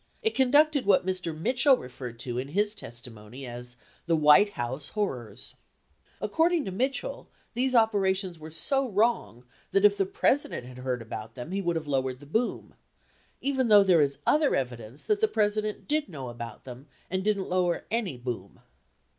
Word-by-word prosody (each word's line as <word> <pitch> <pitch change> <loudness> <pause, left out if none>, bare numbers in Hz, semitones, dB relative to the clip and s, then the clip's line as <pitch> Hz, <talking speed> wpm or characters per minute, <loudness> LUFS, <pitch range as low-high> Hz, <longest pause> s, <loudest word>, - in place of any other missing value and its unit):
It 445 - +1
conducted 285 0 +4
what 190 -2 +4
Mr. 180 -4 -3
Mitchell 255 - +4
referred 125 - -8
to 125 -2 -3
in 130 - -4
his 205 +7 0
testimony 120 - -9
as 120 0 -7 0.3
the 165 - +3
"White 155 +7 +6
House 130 +4 -3
horrors." 130 - -4 0.6
28 - - -4
According 325 +8 +2
to 190 - -4
Mitchell, 270 - -2 0.2
these 255 +2 +1
operations 195 -5 +2
were 155 +1 -9
so 270 - 0
wrong 195 - 0 0.2
that 195 +1 +3
if 205 0 +5
the 195 -1 +1
President 255 - 0
had 125 0 -11
heard 125 -2 -3
about 110 0 -8
them 125 +6 -7
he 195 +1 -1
would 170 -2 -1
have 160 -1 -2
lowered 130 -2 -1
the 145 - -13
boom, 225 +12 -2 0.7
even 265 -2 0
though 205 -2 +7
there 180 -5 +5
is 140 -1 +1
other 300 -1 +3
evidence 125 0 -4
that 420 0 0
the 440 - +4
President 215 - -1
did 300 -5 0
know 135 -7 -6
about 120 -2 -8
them 130 +2 -10 0.2
and 185 +1 -2
didn't 200 -2 0
lower 180 -1 0
any 215 - -1
boom. 120 -6 -6
180 Hz, 175 wpm, -28 LUFS, -, 0.7 s, though